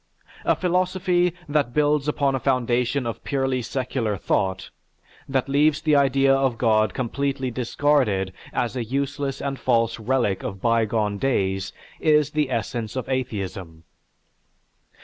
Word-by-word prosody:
A - - +3
philosophy 180 0 +1 0.2
that 145 -4 0
builds 150 -1 +2
upon 140 -2 +1
a 135 - 0
foundation 125 0 +1
of 115 - -5
purely 135 -2 0
secular 120 -4 -2
thought, 95 0 -1 0.6
that 135 -1 0
leaves 145 +2 +3
the 155 -2 +3
idea 135 -1 +4
of 135 -3 +1
God 110 -3 +2
completely 135 +1 -2
discarded 120 -6 +1 0.2
as 120 +1 -1
a 125 - -1
useless 140 +3 -3
and 140 -1 -3
false 115 -2 +1
relic 115 -4 0
of 95 - -5
bygone 110 -2 +1
days, 95 -7 0 0.3
is 150 -2 +3
the 150 -3 0
essence 115 -2 -3
of 130 - -3
atheism. 95 -10 -4
130 Hz, 130 wpm, -23 LUFS, 115-140 Hz, 0.6 s, idea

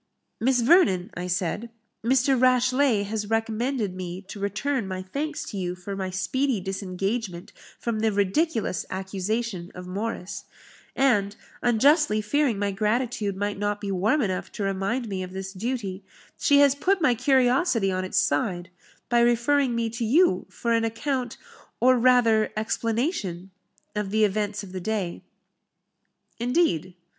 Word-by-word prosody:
"Miss 250 +1 +2
Vernon," 230 - +4
I 180 +1 -5
said, 180 +5 -2 0.3
"Mr. 260 +3 +3
Rashleigh, 255 -2 +3
has 210 0 -4
recommended 225 -1 -1
me 185 +1 -6
to 200 - -7
return 210 +4 -1
my 185 0 -4
thanks 295 +11 -4
to 205 - -5
you 180 -1 -2
for 185 +2 -6
my 190 -1 -3
speedy 220 +7 0
disengagement 195 0 -4 0.2
from 230 -2 -2
the 220 0 +2
ridiculous 205 - 0
accusation 190 0 -3
of 180 - -8
Morris; 200 0 -4 0.5
and, 210 -7 +2 0.3
unjustly 250 +1 +4
fearing 245 +2 +1
my 200 0 0
gratitude 210 0 -1
might 205 0 -2
not 205 0 -1
be 200 -1 -4
warm 215 +10 +2
enough 185 -3 -3
to 205 - -4
remind 195 +6 -1
me 195 -3 -3
of 185 0 -6
this 190 0 -6
duty, 200 -2 -4 0.3
she 285 - +3
has 280 -2 +6
put 370 +7 +1
my 295 -7 +4
curiosity 255 - +2
on 185 0 -1
its 185 - -3
side, 175 +4 0 0.4
by 240 -1 +3
referring 240 +2 +3
me 230 0 0
to 230 +1 -4
you 240 - +3
for 235 - -3
an 230 0 +2
account, 245 +2 -2 0.4
or 255 +2 +5
rather 235 -3 +4
explanation, 220 - -2 0.4
of 210 -2 -2
the 215 +2 +2
events 205 0 -2
of 190 - -10
the 185 0 -5
day." 195 -3 -2 1.2
"Indeed?" 235 - +1
215 Hz, 150 wpm, -25 LUFS, 190-250 Hz, 1.2 s, has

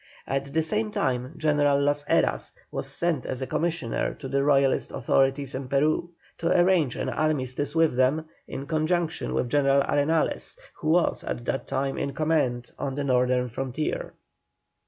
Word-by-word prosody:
At 135 +1 -2
the 160 +2 +1
same 215 +7 -1
time 130 -5 -1
General 145 -2 +3
Las 145 +1 +1
Heras - - +1 0.2
was - - -4
sent 170 -6 -1
as 130 0 -3
a - - -1
commissioner 165 -5 -1
to - - -7
the 140 +1 +1
Royalist 140 -2 +3
authorities 135 +2 +1
in 130 0 -4
Peru, 150 +5 +1 0.3
to 165 - 0
arrange 175 -8 +3
an - - -3
armistice 145 -1 -1
with 160 -5 +3
them, 130 +5 +2 0.2
in 135 - -6
conjunction 160 +2 -1
with - - 0
General 140 -1 +4
Arenales, 155 - 0 0.2
who 155 - -2
was 170 +2 +2
at 120 - -4
that 135 - -2
time 135 0 -1
in 140 - -2
command 135 -6 0
on 135 -1 -2
the 145 - -2
northern 125 -1 +2
frontier. 130 +5 -3
140 Hz, 160 wpm, -26 LUFS, 130-155 Hz, 0.3 s, General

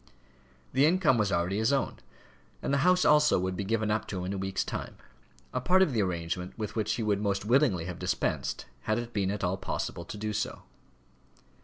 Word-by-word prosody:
The 135 +3 +5
income 165 -8 +3
was 100 -2 +1
already 90 +3 0
his 110 +4 +2
own; 140 -1 0 0.7
and - - 0
the 140 - +3
house 180 +4 +4
also 150 0 +5
would 95 0 -2
be 100 - -2
given 110 +1 0
up 110 - -1
to 95 - -4
him 90 - -3
in 95 - -2
a - - -3
week's 95 0 -1
time - - -5 0.6
a 125 - -1
part 185 +8 +5
of 155 - 0
the 110 - +2
arrangement 90 -1 -3
with 105 -2 -4
which 110 -1 0
he 115 - -2
would 105 -1 +1
most 100 -1 -1
willingly 115 - +3
have 90 -1 -6
dispensed - - -1 0.2
had 110 - +1
it 120 0 -5
been 100 -2 0
at 100 0 -3
all 90 +1 0
possible 85 - -4
to 105 - -7
do 105 +1 -3
so. 105 - -3
105 Hz, 215 wpm, -29 LUFS, 95-125 Hz, 0.7 s, The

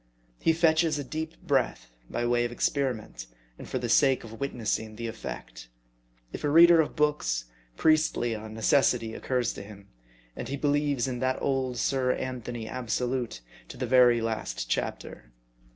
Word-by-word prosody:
He - - +3
fetches 160 -1 +3
a 145 - -3
deep 160 +4 -5
breath, 125 - 0 0.2
by 120 - -2
way 120 0 +2
of 120 - -2
experiment, 120 - -2 0.3
and - - -9
for - - -2
the 125 -1 -3
sake 130 +3 +4
of 115 0 -10
witnessing 110 -5 -2
the 115 +1 -5
effect. - - -7 0.7
If - - -6
a 145 - +1
reader 170 +2 +8
of 155 - -4
books, 145 - 0 0.3
Priestley 155 -7 +2
on 110 0 -7
Necessity 115 -2 +2
occurs 125 -2 -1
to - - -8
him; 100 -1 -12 0.5
and - - -6
he 140 +3 -3
believes 145 -2 +1
in 125 -2 -3
that 130 +1 0
old 130 -2 -1
Sir 130 0 +1
Anthony 120 -3 -5
Absolute 125 - -2 0.3
to - - -10
the 125 - -2
very 120 -1 +5
last 110 - -3
chapter. - - -4
125 Hz, 160 wpm, -28 LUFS, 115-140 Hz, 0.7 s, reader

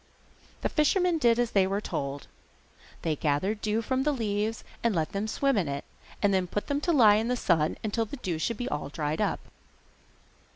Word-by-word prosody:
The - - 0
fisherman 340 +2 +2
did 235 -4 +4
as 240 -1 +1
they 195 -2 +3
told 140 -8 -4 0.8
him 160 -2 0
gathered 175 +9 0
the - - -29
dew 215 +1 0
from 260 +4 0
the 300 +2 +2
leaves 220 -3 -1 0.2
and 230 -4 +2
let 160 +1 0
them 200 +1 -2
swim 275 +3 +1
in 175 - -1
it, 140 0 -4 0.4
then 190 -3 +3
put 205 +4 -3
them 285 0 -1
to 345 - +1
lie 220 -9 +6
in 220 +2 0
the 250 - +1
sun 160 -7 +1
till 225 +2 0
the 285 - -8
dew 175 -9 -3
should 220 +7 -1
be 245 - -3
all 145 - -3
dried 150 +1 -2
up. - - 0
210 Hz, 200 wpm, -28 LUFS, 170-245 Hz, 0.8 s, lie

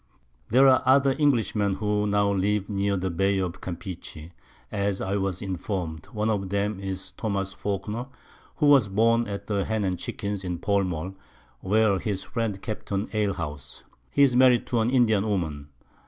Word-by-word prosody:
There 130 +4 +6
are 130 -1 +5
other 135 +1 +4
Englishmen 110 -8 +2
who 105 0 0
now 100 0 +2
live 100 +1 0
near 100 -1 0
the 95 0 -2
Bay 95 +3 +1
of 90 -3 -3
Campeche, 85 -3 -7 0.4
as 100 -1 -1
I 95 +1 -2
was 95 -2 -2
inform'd; 90 -4 -4
one 105 -2 -2
of 100 -4 -1
'em 100 0 -1
is 95 -1 -6
Tho. 110 - -1
Falkner, 105 +4 -4 0.5
he 150 - +3
was 140 -7 +6
born 115 +3 +3
at 100 0 -5
the 100 -2 0
Hen 110 0 -1
and 95 -2 -1
Chickens 100 -1 -4
in 90 -2 -3
Pall 100 +2 +1
mall, 90 +1 -4 0.5
where 105 0 +2
his 100 -2 -3
Friends 115 -4 -2
kept 110 - -6
an 100 +1 -1
Alehouse. 80 -10 -3 0.3
He 140 - +3
is 130 -3 +4
married 125 -1 +5
to 120 - 0
an 110 +1 +2
Indian 115 -6 +3
Woman. 80 -8 -2
100 Hz, 170 wpm, -26 LUFS, 95-110 Hz, 0.5 s, There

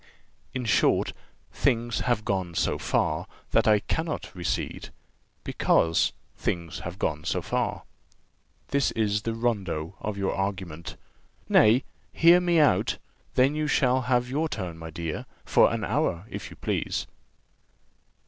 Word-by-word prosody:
In 125 -2 -2
short, 110 - +3 0.4
things 120 -4 +1
have 120 -3 0
gone 95 -4 -1
so - - 0
far - - 0 0.2
that 115 +1 +3
I 105 -1 +6
cannot 160 +6 -3
recede; 90 -3 -3 0.5
because 80 0 +2 0.2
things 85 -3 -3
have 85 +2 -6
gone 75 -6 -1
so - - -1
far.' - - -1 0.9
This 140 -1 +2
is 105 -1 +1
the 115 +1 -2
rondeau 100 -8 -1
of 105 -2 -4
your 100 -1 0
argument. 95 -4 -4 0.5
Nay, 115 +6 +5 0.3
hear 170 +2 +6
me 175 -1 +2
out, 135 -12 +3 0.4
then 130 +3 +4
you 155 0 -1
shall 130 -2 +3
have 125 -1 +3
your 150 +5 -1
turn, 90 - -4
my 80 0 -7
dear, 80 -1 -5 0.2
for - - +5
an - - -2
hour, 85 +3 0
if - - -6
you - - -12
please. - - -2
110 Hz, 140 wpm, -27 LUFS, 90-130 Hz, 0.9 s, I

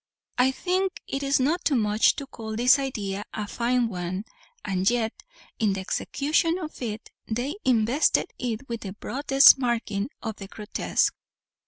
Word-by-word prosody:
I 250 +1 +5
think 370 +7 -1
it 275 - -3
is 275 0 +2
not 315 +8 +1
too 290 - +2
much 210 -2 +3
to 280 - -5
call 220 -5 -7
this 245 +4 +5
idea 205 -7 -3
a 210 -1 -3
fine 240 +2 +1
one; 185 0 -4 0.4
and 190 -1 +1
yet, 235 -2 -1 0.4
in 210 -3 +2
the 195 - -3
execution 310 - 0
of 315 -6 -7
it, 225 -2 -5 0.2
they 245 +6 -2
invested 245 +4 +2
it 245 +1 -3
with 230 -1 -4
the 190 -2 -6
broadest 270 +5 +5
marking 230 -3 -1
of 220 -3 -4
the 195 - -8
grotesque. 210 +1 -1
235 Hz, 160 wpm, -26 LUFS, 210-275 Hz, 0.4 s, I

